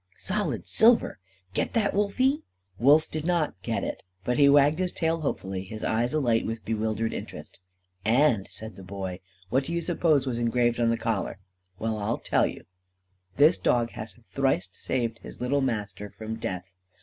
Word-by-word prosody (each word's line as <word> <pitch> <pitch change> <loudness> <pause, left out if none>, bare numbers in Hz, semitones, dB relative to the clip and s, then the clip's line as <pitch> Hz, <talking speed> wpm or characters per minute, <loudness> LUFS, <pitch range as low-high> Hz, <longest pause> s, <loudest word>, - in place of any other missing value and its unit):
Solid 205 +2 -1
silver! 225 - +4 0.3
Get - - -1
that, 220 -4 +2
Wolfie?" 255 +9 +2 0.4
Wolf 145 +5 +5
did 155 -1 -3
not 170 -2 +1
"get - - -2
it." - - -4 0.2
But 125 +5 0
he 140 -1 +7
wagged 145 +3 +5
his 185 -1 0
tail 165 0 0
hopefully, 95 -9 -3
his 110 +3 -8
eyes 120 +3 +1
alight 120 -7 +2
with 115 0 -4
bewildered 110 0 -1
interest. - - -8 0.4
"And," 115 -2 +3
said 110 -3 -9
the 95 - -10
Boy, 95 -1 -5 0.3
"what 135 +2 +2
do 170 - -4
you 170 - +1
suppose 160 -5 +2
was 120 -3 -2
engraved 120 0 +1
on 115 -1 +3
the 115 - +1
collar? 115 -5 -2 0.4
Well, 110 0 -2
I'll 105 +3 -1
tell - - +2
you: - - -8 0.7
'_This 150 +5 +5
dog 120 -1 +2
has 110 +1 -8
thrice 135 -10 0
saved 115 +3 -2
his - - -11
little 140 +3 +1
master 105 -5 -2
from 110 +2 -6
death. 95 -3 -5
120 Hz, 175 wpm, -27 LUFS, 110-150 Hz, 0.7 s, he